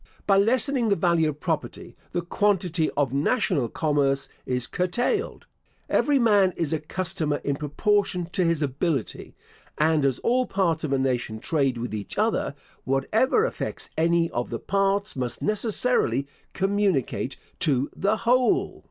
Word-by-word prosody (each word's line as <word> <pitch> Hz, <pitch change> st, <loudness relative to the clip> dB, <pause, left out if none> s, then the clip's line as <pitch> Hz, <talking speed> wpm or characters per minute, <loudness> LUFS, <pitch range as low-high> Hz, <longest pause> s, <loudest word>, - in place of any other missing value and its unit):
By 195 Hz, -, +4 dB
lessening 245 Hz, +3 st, +2 dB
the 200 Hz, -, +4 dB
value 170 Hz, -3 st, +2 dB
of 150 Hz, 0 st, -6 dB
property, 160 Hz, -2 st, -4 dB, 0.2 s
the 175 Hz, -1 st, -2 dB
quantity 180 Hz, -3 st, +1 dB
of 140 Hz, -3 st, +1 dB
national 145 Hz, -, +1 dB
commerce 140 Hz, -2 st, 0 dB, 0.2 s
is 125 Hz, -1 st, 0 dB
curtailed. 245 Hz, -, -1 dB, 0.5 s
Every 290 Hz, -1 st, +3 dB
man 205 Hz, -6 st, +4 dB
is 165 Hz, -2 st, -1 dB
a 160 Hz, -, 0 dB
customer 155 Hz, -1 st, -2 dB
in 140 Hz, -, 0 dB
proportion 180 Hz, +5 st, 0 dB
to 185 Hz, -, 0 dB
his 165 Hz, -3 st, +1 dB
ability; 140 Hz, -1 st, -2 dB, 0.4 s
and 155 Hz, -1 st, +2 dB
as 135 Hz, -3 st, +2 dB
all 250 Hz, +1 st, +2 dB
parts 170 Hz, -5 st, 0 dB
of 150 Hz, -, -2 dB
a 135 Hz, -, +2 dB
nation 125 Hz, -4 st, -1 dB
trade 135 Hz, -1 st, 0 dB
with 120 Hz, -1 st, -4 dB
each 105 Hz, -2 st, -5 dB
other, -, -, 0 dB, 0.3 s
whatever 220 Hz, -, +2 dB
affects -, -, -5 dB
any 165 Hz, +1 st, +2 dB
of 120 Hz, 0 st, -2 dB
the 115 Hz, -, -3 dB
parts 195 Hz, -, 0 dB
must 125 Hz, -2 st, -3 dB
necessarily 210 Hz, -, 0 dB, 0.3 s
communicate 195 Hz, -, 0 dB, 0.2 s
to 140 Hz, -2 st, +1 dB
the 205 Hz, +3 st, +1 dB
whole. 250 Hz, +1 st, +2 dB
165 Hz, 145 wpm, -25 LUFS, 140-205 Hz, 0.5 s, By